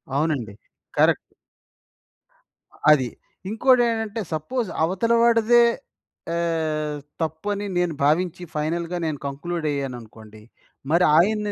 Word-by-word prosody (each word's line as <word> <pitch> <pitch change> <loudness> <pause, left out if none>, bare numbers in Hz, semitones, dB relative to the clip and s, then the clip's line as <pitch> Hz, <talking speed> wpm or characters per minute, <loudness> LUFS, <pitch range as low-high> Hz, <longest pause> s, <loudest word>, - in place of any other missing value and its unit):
అవునండి. 140 -8 -1 0.4
కరెక్ట్. - - +5 1.7
అది. 130 -5 +3 0.4
ఇంకోటేంటంటే, 230 -2 +2
సపోజ్ 215 - -2
అవతల 195 +7 +1
వాడిదే 235 0 +5 0.7
ఆహ్, 155 -3 -1 0.2
తప్పు 160 +5 -3
అని 205 0 -4
నేను 175 -2 +1
భావించి 165 +5 +1
ఫైనల్‌గా 170 +3 -2
నేను 155 -2 -2
కంక్లూడయ్యాననుకోండి. 135 -8 -5 0.5
మరి 175 +2 +4
ఆయన్ని 210 +4 +2
165 Hz, 90 wpm, -23 LUFS, 150-210 Hz, 1.7 s, కరెక్ట్